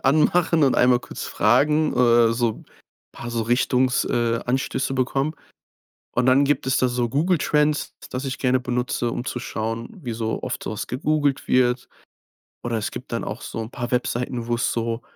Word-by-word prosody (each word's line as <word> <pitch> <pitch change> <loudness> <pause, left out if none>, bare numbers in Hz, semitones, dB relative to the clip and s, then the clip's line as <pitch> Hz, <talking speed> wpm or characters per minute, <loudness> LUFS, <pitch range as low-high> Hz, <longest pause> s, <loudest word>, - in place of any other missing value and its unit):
anmachen 155 +2 +3
und 130 - +3
einmal 125 0 +4
kurz - - -7
fragen, 150 +7 +2
äh, 120 -2 +5
so 115 -2 -1 0.5
paar 120 - -7
so 115 -1 -1
Richtungs 125 +2 +2
äh, 115 -1 0
Anstöße 130 +1 -1
bekommen. 135 +4 0 0.8
Und 125 +1 +2
dann 130 +2 +5
gibt 145 -2 0
es 130 - +2
da 130 - +3
so 120 -1 -1
Google 160 +8 +1
Trends, 150 +1 +1 0.2
das 130 +2 -4
ich 135 - -4
gerne 130 -1 +2
benutze, 125 -1 -1
um 120 - -4
zu 125 - -3
schauen, 115 -1 -4
wie 120 -3 -4
so 110 0 -3
oft - - -4
so - - -4
was 110 - -4
gegoogelt 145 +1 0
wird. 125 -1 +2 0.8
Oder 120 -1 -1
es 110 - -3
gibt 130 - -9
dann 115 - -2
auch 110 +5 -5
so - - -6
'n 110 - -6
paar 120 0 -5
Webseiten, 125 -1 -1
wo 120 - +1
es 120 - 0
so, 115 0 -2
125 Hz, 185 wpm, -23 LUFS, 120-135 Hz, 0.8 s, äh